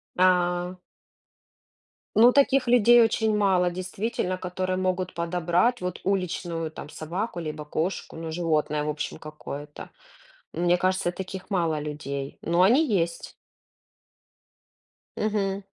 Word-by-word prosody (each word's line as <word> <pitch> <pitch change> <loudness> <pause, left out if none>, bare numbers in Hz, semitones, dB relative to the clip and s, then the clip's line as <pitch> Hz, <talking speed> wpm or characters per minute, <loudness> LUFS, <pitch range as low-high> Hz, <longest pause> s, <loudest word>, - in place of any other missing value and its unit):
А. 180 0 +2 1.4
Ну, 235 +3 +7
таких 275 -2 +3
людей 240 0 +6
очень 220 -1 +2
мало, 185 -3 +3
действительно, 185 +1 -3
которые 185 0 -3
могут 185 0 -1
подобрать, 175 +7 +1
вот, 180 0 -4
уличную, 175 -4 -2
там, 155 - -9
собаку 175 +6 -4
либо 155 -2 -5
кошку, 160 +4 -3
ну, 165 0 -5
животное, 155 -3 0
в 150 - -2
общем, 150 0 -4
какое-то. 150 -1 -8 0.6
Мне 175 +1 +2
кажется, 185 0 +1
таких 190 +1 -7
мало 165 -5 0
людей, 140 -2 -5
но 170 +2 +2
они 250 +12 +5
есть. 170 0 -4 1.8
Мгм. 200 -2 -1
180 Hz, 115 wpm, -26 LUFS, 165-195 Hz, 1.8 s, Ну